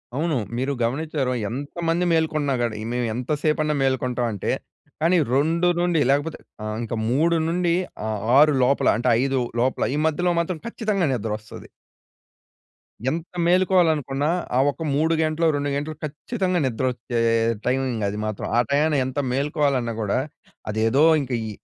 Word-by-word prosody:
అవును. 155 Hz, -1 st, 0 dB, 0.2 s
మీరు 135 Hz, +3 st, -1 dB
గమనించ్చారొ, 135 Hz, +1 st, -1 dB, 0.2 s
ఎంతమంది 165 Hz, +7 st, -2 dB
మేల్కొన్నా 155 Hz, -3 st, +1 dB
గాని 110 Hz, -3 st, -2 dB
మేము 125 Hz, 0 st, 0 dB
ఎంత 125 Hz, +5 st, -4 dB
సేపన్నా 155 Hz, -1 st, +1 dB
మేల్కొంటామంటే, 125 Hz, -5 st, -1 dB, 0.5 s
కానీ 170 Hz, +3 st, +4 dB, 0.2 s
2 165 Hz, +5 st, +2 dB
నుండి 175 Hz, -2 st, +2 dB
లేకపోతే 145 Hz, +3 st, 0 dB, 0.2 s
ఆహ్, 110 Hz, 0 st, -3 dB
ఇంకా 115 Hz, 0 st, -4 dB
3 165 Hz, +6 st, +2 dB
నుండి 170 Hz, 0 st, +1 dB, 0.3 s
ఆహ్, 110 Hz, -1 st, -2 dB, 0.2 s
6 150 Hz, +1 st, +6 dB
లోపల 135 Hz, +3 st, +2 dB
అంటే, 125 Hz, +2 st, 0 dB
5 135 Hz, -1 st, +1 dB, 0.2 s
లోపల, 130 Hz, +1 st, 0 dB
ఈ -, -, -1 dB
మధ్యలో 175 Hz, +3 st, +1 dB
మాత్రం 170 Hz, -1 st, -2 dB
ఖచ్చితంగా 215 Hz, -5 st, -1 dB
నిద్రొస్తాది. 110 Hz, -2 st, -5 dB, 1.4 s
ఎంత 165 Hz, +3 st, -4 dB
మేలుకోవాలనుకున్నా, 160 Hz, -6 st, +2 dB, 0.3 s
ఆ -, -, +4 dB
ఒక్క 155 Hz, -, -14 dB
3 160 Hz, +3 st, +2 dB
గంటలు, 155 Hz, +1 st, 0 dB
2 145 Hz, 0 st, -1 dB
గంటలు 150 Hz, +2 st, -3 dB
ఖచ్చితంగా 180 Hz, -, -2 dB
నిద్రొచ్చే 125 Hz, -1 st, -2 dB, 0.5 s
టైమింగ్ 125 Hz, -3 st, 0 dB
అది 100 Hz, +1 st, -3 dB
మాత్రం. 110 Hz, -2 st, -4 dB
ఆ -, -, +5 dB
టైయాన 150 Hz, +2 st, +2 dB
ఎంత 130 Hz, +2 st, -3 dB
మేలుకోవాలన్నా 140 Hz, -3 st, 0 dB
గూడా 105 Hz, +1 st, 0 dB, 0.5 s
అదేదో, 110 Hz, +7 st, +2 dB, 0.2 s
ఇంక 135 Hz, -2 st, -6 dB, 0.2 s
ఈ -, -, -5 dB
145 Hz, 140 wpm, -23 LUFS, 125-165 Hz, 1.4 s, 6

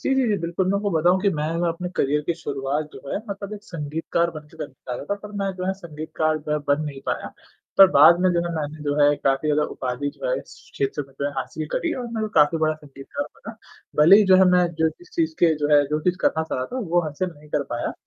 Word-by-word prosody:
जी, 270 Hz, -, +1 dB
जी, 265 Hz, -2 st, +2 dB
जी। 210 Hz, -, +2 dB
बिल्कुल 170 Hz, +2 st, -1 dB
मैं 200 Hz, -, +2 dB
आपको 205 Hz, 0 st, -1 dB
बताऊँ 175 Hz, +3 st, +3 dB
कि 205 Hz, -, +4 dB
मैं 150 Hz, 0 st, -2 dB
अगर 170 Hz, +1 st, 0 dB
अपने 175 Hz, +2 st, -3 dB
करियर 145 Hz, +2 st, +2 dB
की 170 Hz, -, +1 dB
शुरुआत 145 Hz, -1 st, -3 dB
जो -, -, -10 dB
है -, -, 0 dB
मतलब 200 Hz, 0 st, -6 dB
एक 205 Hz, -, -10 dB
संगीतकार 165 Hz, +1 st, -2 dB
बनके 155 Hz, -2 st, -11 dB
मैं -, -, -4 dB
निकला 130 Hz, -1 st, -8 dB
था, 200 Hz, -, -1 dB
पर 205 Hz, +1 st, -11 dB
मैं 195 Hz, -1 st, -1 dB
जो 185 Hz, -, -4 dB
है 190 Hz, -, +1 dB
संगीतकार 155 Hz, -3 st, -2 dB
बन 145 Hz, -1 st, +1 dB
नहीं 140 Hz, -2 st, -6 dB
पाया। -, -, -3 dB, 0.5 s
पर 195 Hz, -, +11 dB
बाद 160 Hz, +3 st, +7 dB
में 185 Hz, -, +4 dB
जो 170 Hz, -, +2 dB
है 170 Hz, -, -3 dB
मैंने 155 Hz, -1 st, -4 dB
जो 145 Hz, -1 st, 0 dB
है 145 Hz, 0 st, +5 dB
काफ़ी 135 Hz, +2 st, 0 dB
ज़्यादा 150 Hz, 0 st, +2 dB
उपाधि 130 Hz, +2 st, -3 dB
जो -, -, -4 dB
है -, -, +1 dB
इस -, -, -12 dB, 0.2 s
क्षेत्र 140 Hz, +1 st, -2 dB
में 135 Hz, -, -21 dB
जो 140 Hz, -, +1 dB
है -, -, -2 dB
हासिल 155 Hz, +4 st, -4 dB
करीं 335 Hz, -, -1 dB
और 245 Hz, -, -4 dB
मैं 230 Hz, -1 st, -4 dB
जो 215 Hz, -, 0 dB
है -, -, -9 dB
काफ़ी 150 Hz, +1 st, +4 dB
बड़ा 155 Hz, 0 st, +1 dB
संगीतकार 150 Hz, -, -7 dB
बना। -, -, -10 dB, 0.5 s
भले 180 Hz, +6 st, +9 dB
ही 210 Hz, -, +5 dB
जो 185 Hz, -, +9 dB
है 190 Hz, -, +6 dB
मैं 180 Hz, -1 st, +4 dB
जो 160 Hz, 0 st, +3 dB
इस 355 Hz, -, -17 dB
चीज़ 325 Hz, -2 st, 0 dB
के 165 Hz, -2 st, +4 dB
जो 145 Hz, -1 st, 0 dB
है 145 Hz, -, +6 dB
जो 150 Hz, +1 st, -1 dB
चीज़ 180 Hz, +3 st, +1 dB
करना 160 Hz, -, +2 dB
चाह 160 Hz, -, -4 dB
रहा 130 Hz, -, -2 dB
था 260 Hz, -, -2 dB
वो 175 Hz, +1 st, +3 dB
हासिल 155 Hz, +4 st, -3 dB
नहीं 150 Hz, 0 st, -17 dB
कर 150 Hz, -, +1 dB
पाया। 120 Hz, -, -2 dB
160 Hz, 270 wpm, -23 LUFS, 145-190 Hz, 0.5 s, पर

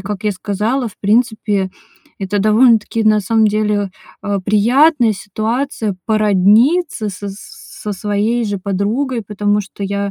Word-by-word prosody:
как 205 Hz, +1 st, -5 dB
я 210 Hz, -, +2 dB
сказала, 215 Hz, +7 st, -2 dB
в 205 Hz, -, -17 dB
принципе, 210 Hz, -3 st, +1 dB, 0.5 s
это 195 Hz, +1 st, -2 dB
довольно-таки, 225 Hz, +1 st, +3 dB
на 215 Hz, 0 st, +4 dB
самом 220 Hz, +2 st, +2 dB
деле, 210 Hz, -1 st, 0 dB, 0.3 s
э 205 Hz, -1 st, -1 dB
приятная 240 Hz, -, +3 dB
ситуация 215 Hz, +2 st, -3 dB
породниться 215 Hz, -, +2 dB
со 200 Hz, +1 st, -6 dB
с 195 Hz, +1 st, -11 dB, 0.2 s
со 210 Hz, -, -4 dB
своей 210 Hz, +4 st, -1 dB
же 205 Hz, -2 st, -3 dB
подругой, 215 Hz, +7 st, -2 dB
потому 205 Hz, 0 st, 0 dB
что 200 Hz, 0 st, -9 dB
я, 200 Hz, 0 st, -2 dB
210 Hz, 135 wpm, -16 LUFS, 200-230 Hz, 0.5 s, на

